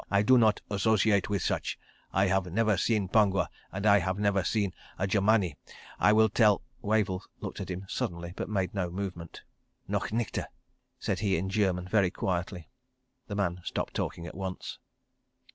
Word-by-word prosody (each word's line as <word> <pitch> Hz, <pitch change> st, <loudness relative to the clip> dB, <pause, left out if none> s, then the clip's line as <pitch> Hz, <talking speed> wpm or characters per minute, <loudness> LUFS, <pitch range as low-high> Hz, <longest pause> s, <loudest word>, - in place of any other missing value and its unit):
I 100 Hz, 0 st, +3 dB
do 130 Hz, +5 st, +6 dB
not 110 Hz, -4 st, +4 dB
associate 105 Hz, -1 st, +2 dB
with 100 Hz, -3 st, 0 dB
such. -, -, -1 dB, 0.3 s
I 95 Hz, +1 st, +3 dB
have 95 Hz, -2 st, 0 dB
never 110 Hz, +2 st, +2 dB
seen 100 Hz, +1 st, +1 dB
Pongwa, 95 Hz, -2 st, +3 dB, 0.2 s
and 95 Hz, +2 st, -4 dB
I 100 Hz, -1 st, +6 dB
have 95 Hz, +1 st, -1 dB
never 100 Hz, -2 st, +2 dB
seen 100 Hz, 0 st, 0 dB, 0.2 s
a 95 Hz, -, 0 dB
Germani. 100 Hz, -4 st, +2 dB, 0.4 s
I 105 Hz, -, +5 dB
will 110 Hz, +1 st, +5 dB
tell.. 105 Hz, -2 st, +3 dB
." 125 Hz, -, -37 dB
Wavell 105 Hz, -4 st, +1 dB, 0.2 s
looked -, -, -6 dB
at -, -, -6 dB
him 95 Hz, +1 st, -5 dB
suddenly, 85 Hz, -2 st, -3 dB
but -, -, -4 dB
made 95 Hz, -4 st, -1 dB
no 95 Hz, -3 st, -1 dB
movement. 90 Hz, -3 st, -6 dB, 0.4 s
"Noch -, -, -1 dB
nichte!" 115 Hz, -2 st, -1 dB, 0.5 s
said 95 Hz, -, -2 dB
he 100 Hz, -3 st, +1 dB
in 95 Hz, +3 st, -2 dB
German, 95 Hz, -4 st, +1 dB
very 100 Hz, -2 st, +3 dB
quietly. 90 Hz, -2 st, -3 dB, 0.6 s
The 100 Hz, -, -4 dB
man 90 Hz, -3 st, -1 dB
stopped -, -, -3 dB
talking 85 Hz, -, -3 dB
at -, -, -7 dB
once. 95 Hz, -1 st, -5 dB
100 Hz, 175 wpm, -29 LUFS, 90-105 Hz, 0.6 s, do